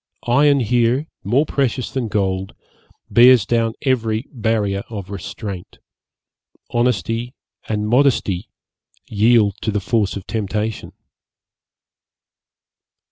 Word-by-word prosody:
Iron 140 +3 +4
here, 120 +4 +1 0.2
more 125 +10 +2
precious 135 -4 -1
than 130 -4 -2
gold, 95 -4 -2 0.6
bears 120 0 +7
down 115 0 +1
every 115 -3 0
barrier 110 -5 0
of 100 -4 -7
restraint; 100 -1 -7 0.9
honesty 120 - -1 0.3
and 105 -1 -1
modesty 120 -7 +1 0.6
yield 110 -1 +3
to - - -2
the 105 -1 0
force 105 +1 0
of 100 - -7
temptation.' 110 0 -3
110 Hz, 95 wpm, -20 LUFS, 100-120 Hz, 0.9 s, bears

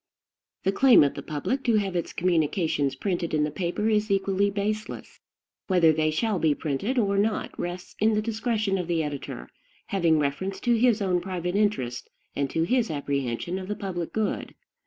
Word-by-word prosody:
The 195 - +2
claim 250 - +6
of 140 - +1
the 140 - -6
public 155 - -3
to 235 -2 +3
have 195 -3 0
its 170 - -2
communications 160 -4 +1
printed 170 +1 -2
in 150 - +2
the 150 - -1
paper 180 +6 -2
is 215 -1 +1
equally 195 0 +2
baseless. 210 +2 -4 0.5
Whether 175 -4 +5
they 155 0 +1
shall 200 +5 0
be 155 -3 +2
printed 165 - -2
or 200 -4 +2
not 215 +1 0
rests 175 +1 -5
in 220 +1 +3
the 210 - +2
discretion 215 -3 -1
of 180 - -3
the 165 -2 +1
editor, 145 -2 -6 0.4
having 170 -5 +2
reference 150 +7 -2
to 240 - +2
his 230 -3 +3
own 180 -2 +1
private 180 -1 -3
interest, 130 - 0 0.3
and 140 -1 -1
to 165 - 0
his 240 +5 +1
apprehension 140 +3 -2
of 185 - -7
the 210 - -2
public 175 -5 -4
good. 220 -1 -2
185 Hz, 180 wpm, -26 LUFS, 155-210 Hz, 0.5 s, claim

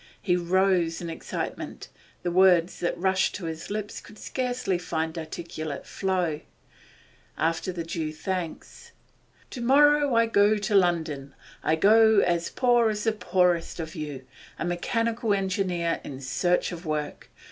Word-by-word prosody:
He 180 -3 +1
rose 180 -1 +2
in 170 -1 -5
excitement; 165 - -6 0.3
the 175 - -1
words 180 -1 +4
that 175 - -1
rushed 190 +1 +1
to 185 - -6
his 160 0 -6
lips 210 0 -4
could 215 - -15
scarcely 245 -8 -2
find 160 -2 -3
articulate 155 -2 -6
flow. 180 -5 -1 1.0
After 165 +3 0
the 175 -2 -4
due 165 -2 -3
thanks: 175 +1 -5 0.6
'To 250 - -6
morrow 290 +1 +4
I 230 0 +5
go 210 -1 +3
to 205 0 -2
London; 160 -7 +1 0.3
I 155 - +2
go 220 +5 +5
as 175 -3 +2
poor 240 -3 +3
as 210 -1 -2
the 225 - +2
poorest 180 -5 +1
of 160 -1 -5
you, 145 -6 -6 0.3
a - - -3
mechanical 225 +5 0
engineer 185 -4 -1
in 135 -2 -7
search 175 +7 0
of 175 -1 -7
work. 155 -2 -4
180 Hz, 145 wpm, -26 LUFS, 165-210 Hz, 1.0 s, I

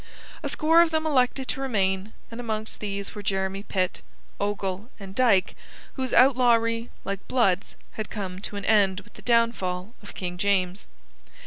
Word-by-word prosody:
A - - -3
score 325 +2 +5
of 340 - +4
them 315 0 0
elected 260 -3 +2
to 270 - -2
remain, 195 -5 0 0.2
and 230 - -7
amongst 220 -2 -4
these 200 -1 -4
were 210 - -6
Jeremy 190 0 -1
Pitt, 185 -3 -1 0.4
Ogle, 200 +1 -2
and 195 -1 -9
Dyke, 225 -6 +3 0.4
whose 260 -2 -3
outlawry, 235 -3 +4 0.2
like 195 0 -4
Blood's, 200 -7 +1 0.2
had 215 - -5
come 190 -3 -5
to 205 - -7
an 200 -1 -4
end 200 -3 +3
with 210 +1 -20
the - - -13
downfall 230 -5 +1
of 205 - -12
King 180 -1 -5
James. 190 -1 0
205 Hz, 160 wpm, -26 LUFS, 190-240 Hz, 0.4 s, score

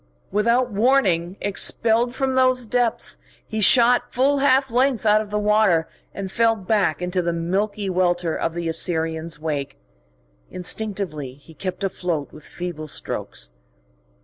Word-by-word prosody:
Without 235 +4 +2
warning 200 -6 +2
expelled 230 +4 +1
from 265 -1 -1
those 255 -1 +2
depths, 230 - -1 0.3
he 220 - -4
shot 240 +4 +5
full 275 +3 +2
half 270 -1 +3
length 250 -1 +1
out 210 0 +4
of 210 -1 -9
water, 210 -5 +2 0.2
and 195 -1 -6
fell 230 +1 +3
back 190 -5 0
into 180 +1 -1
the 170 0 -1
milky 195 +5 -2
welter 175 -2 0
of 165 - -2
the 170 -1 -3
Assyrian's 160 -1 0
wake. 150 -3 -4 0.7
Instinctively 180 -8 -4
he 145 +3 -17
kept 185 +3 -5
afloat 175 -6 -3
with 155 - -13
feeble 170 -3 -6
strokes. - - -5
195 Hz, 135 wpm, -22 LUFS, 170-230 Hz, 0.7 s, shot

